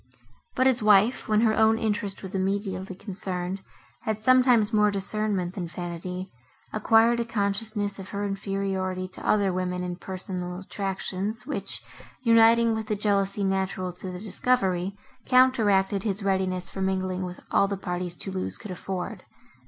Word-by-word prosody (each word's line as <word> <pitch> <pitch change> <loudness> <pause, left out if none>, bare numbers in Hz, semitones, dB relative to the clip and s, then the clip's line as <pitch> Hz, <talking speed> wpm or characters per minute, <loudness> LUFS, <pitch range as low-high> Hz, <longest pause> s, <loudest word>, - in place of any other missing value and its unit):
But 260 - +2
his 260 -3 +3
wife, 210 +3 +5
who, - - -8
when 215 0 +4
her 220 -2 +3
own 220 0 +4
interest 205 -3 -1
was 190 +1 -5
immediately 190 0 -2
concerned, 185 -1 -4 0.4
had 220 -2 -2
sometimes 250 -3 +5
more 210 -1 +4
discernment 200 -2 -1
than 180 -3 -4
vanity, 180 +2 -6 0.4
acquired 225 +2 +4
a - - +1
consciousness 205 -2 -1
of 195 - -8
her 205 0 -3
inferiority 195 -2 -2
to 185 - -9
other 200 -3 +3
women, 180 0 -2
in 180 -1 -4
personal 180 -1 -4
attractions, 195 +3 -3
which, 200 -9 -3 0.4
uniting 230 0 +5
with 220 -1 -3
the 215 - 0
jealousy 200 -1 +1
natural 190 -1 -1
to 180 - -6
the 180 - -6
discovery, 195 -2 0 0.3
counteracted 210 -7 +4
his 200 -1 0
readiness 190 -2 0
for 195 - -6
mingling 185 -1 -1
with 180 0 -6
all 200 - +4
the 200 0 -3
parties 180 -1 -3
Thoulouse 185 +5 -2
could 215 - -8
afford. 185 0 -5
195 Hz, 150 wpm, -26 LUFS, 185-215 Hz, 0.4 s, wife